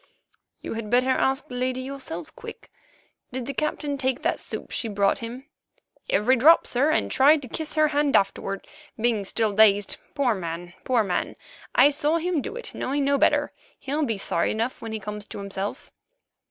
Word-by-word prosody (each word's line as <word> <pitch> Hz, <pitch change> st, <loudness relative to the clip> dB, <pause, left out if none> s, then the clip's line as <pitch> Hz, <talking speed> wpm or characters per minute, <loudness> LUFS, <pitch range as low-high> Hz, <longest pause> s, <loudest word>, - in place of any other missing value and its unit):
"You -, -, -4 dB
had 225 Hz, -2 st, -5 dB
better 250 Hz, +3 st, +3 dB
ask 265 Hz, +1 st, +1 dB
the -, -, -10 dB
lady 255 Hz, +1 st, -2 dB
herself, 275 Hz, +4 st, -7 dB
Quick. 460 Hz, -2 st, -11 dB, 0.6 s
Did 255 Hz, -1 st, -4 dB
the 280 Hz, -, -4 dB
Captain 290 Hz, 0 st, -2 dB
take 260 Hz, -1 st, -1 dB
that -, -, 0 dB
soup -, -, -7 dB
she 230 Hz, -, -2 dB
brought 200 Hz, -2 st, +1 dB
him?" 240 Hz, +3 st, -7 dB, 0.6 s
"Every 235 Hz, +6 st, +3 dB
drop, 310 Hz, +7 st, +6 dB
sir, 265 Hz, +5 st, +2 dB
and 310 Hz, -, +1 dB
tried 290 Hz, +2 st, +5 dB
to -, -, -7 dB
kiss 315 Hz, +6 st, -4 dB
her 310 Hz, -1 st, +4 dB
hand 290 Hz, -1 st, +1 dB
afterward, 195 Hz, 0 st, 0 dB, 0.3 s
being 225 Hz, -3 st, +1 dB
still 215 Hz, +1 st, 0 dB
dazed, 205 Hz, -1 st, +4 dB, 0.2 s
poor 270 Hz, -5 st, +2 dB
man, 175 Hz, -2 st, -6 dB
poor 250 Hz, -4 st, +3 dB
man! 180 Hz, -3 st, -2 dB, 0.4 s
I 275 Hz, +4 st, +7 dB
saw 300 Hz, +2 st, +1 dB
him 340 Hz, -2 st, 0 dB
do 415 Hz, -, -6 dB
it, 485 Hz, -, -6 dB
knowing 280 Hz, +1 st, -1 dB
no 280 Hz, 0 st, +2 dB
better. -, -, +3 dB, 0.3 s
He'll 290 Hz, +3 st, -2 dB
be 225 Hz, -7 st, -1 dB
sorry 170 Hz, -3 st, 0 dB
enough 230 Hz, +4 st, -2 dB
when 225 Hz, -, -6 dB
he 220 Hz, -, -3 dB
comes 210 Hz, 0 st, -6 dB
to -, -, -8 dB
himself." 200 Hz, 0 st, -5 dB
255 Hz, 185 wpm, -25 LUFS, 210-285 Hz, 0.6 s, I